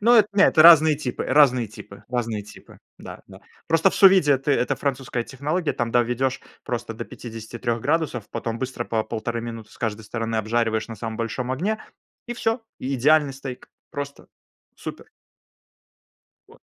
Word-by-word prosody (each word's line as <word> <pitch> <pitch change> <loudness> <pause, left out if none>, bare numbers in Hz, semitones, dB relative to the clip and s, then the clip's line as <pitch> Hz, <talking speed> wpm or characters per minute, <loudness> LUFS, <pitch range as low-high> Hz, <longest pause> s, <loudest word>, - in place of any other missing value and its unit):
Ну, 235 +3 +5
это 215 -3 +6
не 200 0 +5
это 155 - +5
разные 160 -2 +8
типы, 130 -5 -4
разные 130 -4 +4
типы, 100 -1 -13
разные 115 -4 -2
типы. 100 - -15 0.2
Да, - - -10
да. - - -14 0.3
Просто 165 +3 +3
в - - -7
су-виде 185 -8 +6
ты, 140 +2 0
это 135 0 +1
французская 130 -3 -2
технология, 150 +5 -2
там 120 0 -2
доведешь 125 +2 +1 0.2
просто - - -4
до - - -6
53 115 +1 -5
градусов, 145 -6 -1
потом 115 0 -4
быстро 130 -2 -4
по 110 -2 -1
1,5 115 +1 -3
минуты 115 -2 -7
с - - -18
каждой 110 -2 -3
стороны 115 +1 -3
обжариваешь 110 +1 0
на 115 - -7
самом 115 -1 -5
большом 115 +2 -3
огне 200 +11 -2 0.4
и 240 - -4
всё. 225 0 -1 0.2
И 135 +2 -3
идеальный 145 +2 +3
стейк, 135 -2 -8 0.2
просто. 140 -2 -7 0.5
Супер! - - -8 1.4
Вот. - - -18
130 Hz, 165 wpm, -23 LUFS, 115-150 Hz, 1.4 s, разные